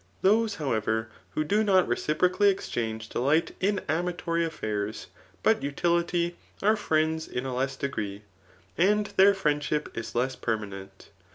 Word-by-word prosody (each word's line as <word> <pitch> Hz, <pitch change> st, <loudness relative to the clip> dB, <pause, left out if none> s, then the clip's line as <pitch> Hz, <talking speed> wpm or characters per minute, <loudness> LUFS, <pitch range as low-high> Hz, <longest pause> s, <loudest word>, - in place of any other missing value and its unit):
Those, 215 Hz, +2 st, +3 dB
however, 110 Hz, -, -1 dB, 0.3 s
who 155 Hz, -, +1 dB
do 205 Hz, +8 st, +2 dB
not 190 Hz, -3 st, +4 dB
reciprocally 180 Hz, +6 st, +2 dB
exchange 110 Hz, -, -3 dB
delight 145 Hz, +7 st, +1 dB
in 200 Hz, +1 st, +1 dB
amatory 170 Hz, +1 st, -1 dB
a^airs, 105 Hz, -7 st, -4 dB, 0.4 s
but -, -, +4 dB
ud? 140 Hz, +1 st, -5 dB
lity, 170 Hz, 0 st, +1 dB, 0.3 s
are 215 Hz, +2 st, +5 dB
friends 160 Hz, -5 st, 0 dB
in 125 Hz, -, -4 dB
a 130 Hz, -, -3 dB
less 135 Hz, +2 st, -1 dB
degree, 105 Hz, -7 st, -4 dB, 0.6 s
and 210 Hz, +4 st, +4 dB
their 200 Hz, +1 st, +6 dB
friendship 150 Hz, -3 st, -1 dB
is 115 Hz, 0 st, -5 dB
less 130 Hz, +2 st, 0 dB
permanent. 100 Hz, -4 st, -5 dB
155 Hz, 140 wpm, -27 LUFS, 115-180 Hz, 0.6 s, their